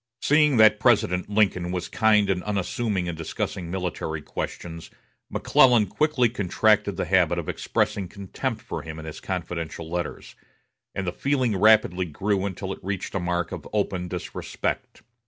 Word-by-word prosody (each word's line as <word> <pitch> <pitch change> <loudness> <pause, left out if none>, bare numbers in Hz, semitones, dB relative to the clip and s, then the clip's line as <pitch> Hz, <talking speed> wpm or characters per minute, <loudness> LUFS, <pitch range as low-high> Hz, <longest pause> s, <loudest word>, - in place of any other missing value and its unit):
Seeing 150 -3 +4
that 110 -1 +6
President 100 -6 +2
Lincoln 95 -4 +1
was 90 -1 -3
kind 105 -2 +3
and 90 -1 -1
unassuming 100 0 -1
in 85 - -3
discussing 85 +2 -4
military 85 -4 -3
questions, 85 +1 -6 0.4
McClellan 120 -5 +4
quickly 140 - +2
contracted 105 -2 +1
the - - -1
habit - - +3
of - - -3
expressing 100 -3 -1
contempt 100 +1 -5
for - - -5
him 80 -1 -8
in 80 - -8
his 80 - -7
confidential 85 -3 -4
letters; 85 +1 -4 0.6
and 95 - -2
the 90 - -1
feeling 130 0 0
rapidly 95 -3 +4
grew 95 +5 -1
until 95 0 -4
it - - -13
reached 95 0 -4
a 95 - 0
mark 85 -1 -1
of - - -7
open 95 -4 -1
disrespect. 90 -1 -4
95 Hz, 155 wpm, -25 LUFS, 90-105 Hz, 0.6 s, that